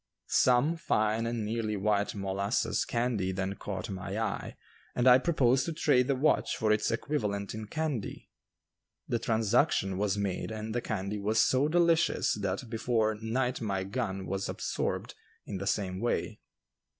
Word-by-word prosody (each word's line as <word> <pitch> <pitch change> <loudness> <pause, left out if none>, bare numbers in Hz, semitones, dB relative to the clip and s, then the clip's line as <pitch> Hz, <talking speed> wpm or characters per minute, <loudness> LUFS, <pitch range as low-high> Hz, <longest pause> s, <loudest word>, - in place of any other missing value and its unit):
Some 130 +7 +3
fine 110 -6 +1
and 115 -2 -2
nearly 110 -1 -2
white 105 +1 0
molasses 100 +3 0
candy 115 -6 0
then 95 +1 -2
caught 100 -2 -5
my 95 +2 -4
eye, 110 -3 -3 0.4
and 125 +1 +2
I 125 0 +8
proposed 130 -5 +2
to 165 - -2
trade 130 -5 +3
the 140 - +2
watch 140 +4 +1
for 110 -2 +1
its 110 0 +2
equivalent 105 -6 -2
in 110 0 -6
candy. 150 -6 -4 0.8
The 120 - 0
transaction 110 -3 +1
was 100 -1 +1
made 100 -2 -2
and 110 0 -5
the 120 - -1
candy 105 -1 -3
was 110 +2 +1
so 130 +5 +3
delicious 165 -7 +3
that 100 +5 -2
before 110 -1 +1
night 125 +3 -1
my 100 -4 -1
gun 95 -2 -3
was 95 0 -3
absorbed - - -3 0.3
in 95 - -5
the 100 - -4
same 95 -3 -1
way. 120 +3 -1
110 Hz, 155 wpm, -30 LUFS, 100-125 Hz, 0.8 s, I